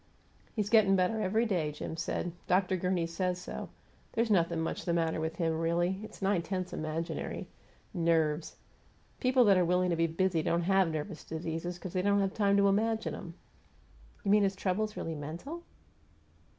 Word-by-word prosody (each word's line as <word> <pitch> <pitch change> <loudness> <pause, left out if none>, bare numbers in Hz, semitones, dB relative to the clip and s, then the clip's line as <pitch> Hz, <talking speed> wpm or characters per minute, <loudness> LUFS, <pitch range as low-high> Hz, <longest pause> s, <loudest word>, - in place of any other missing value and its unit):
"He's 210 -2 -1
gettin' 210 -4 +6
better 190 +4 +1
every 215 +4 +2
day," 175 -8 0
Jim 150 +2 -6
said. 170 +1 -2 0.2
"Dr. 185 +1 +2
Gurney 180 -1 0
says 180 +2 -2
so. - - -6 0.4
There's 230 -1 +1
nothing 170 -3 +2
much 160 - -2
the 170 - 0
matter 165 -1 +1
with 160 +1 -2
him, 165 -1 0
really 175 +3 +1
it's 215 -2 -9
nine 190 -2 +2
tenths 185 +1 -4
imaginary. 155 +2 -3 0.5
'Nerves'! 165 -3 +1 0.6
People 255 -1 +4
that 200 -3 +6
are 180 - +4
willing 180 +1 +2
to - - +2
be 165 0 +2
busy 170 0 +1
don't 170 +2 +1
have 190 0 +3
nervous 160 +2 -4
diseases, 165 +2 -4
because 175 0 -7
they 185 - +1
don't 200 +1 +3
have 195 -1 0
time 200 -2 +3
to 200 0 +5
imagine 220 +3 +1
'em." 170 -1 -8 0.9
"You 200 - +1
mean 210 0 +6
his 195 -1 +1
trouble 190 +2 0
is 215 - -10
really 165 - -3
mental?" 165 - -6
180 Hz, 180 wpm, -31 LUFS, 165-200 Hz, 0.9 s, gettin